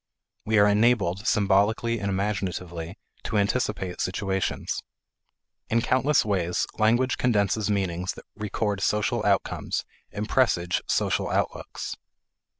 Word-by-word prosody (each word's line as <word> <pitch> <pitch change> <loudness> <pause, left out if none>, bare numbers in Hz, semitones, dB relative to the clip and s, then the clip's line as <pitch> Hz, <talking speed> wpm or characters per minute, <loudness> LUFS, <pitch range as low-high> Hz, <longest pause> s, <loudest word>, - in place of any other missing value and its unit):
We 110 0 +2
are 100 - +7
enabled, 105 -3 +2
symbolically 105 +3 +2
and 100 - -2
imaginatively, 95 -3 -3 0.3
to 110 - -1
anticipate 100 -3 0
situations. 95 0 -2 0.9
In 115 +1 +2
countless 130 +2 +3
ways, 90 -4 0
language 120 +4 +3
condenses 105 -3 +1
meanings 95 -2 -1
that - - -13
record 105 -1 -2
social 105 +1 +1
outcomes - - 0 0.3
and 105 +1 -4
presage 90 -10 +2
social - - +1
outlooks. - - -2
105 Hz, 110 wpm, -26 LUFS, 95-110 Hz, 0.9 s, are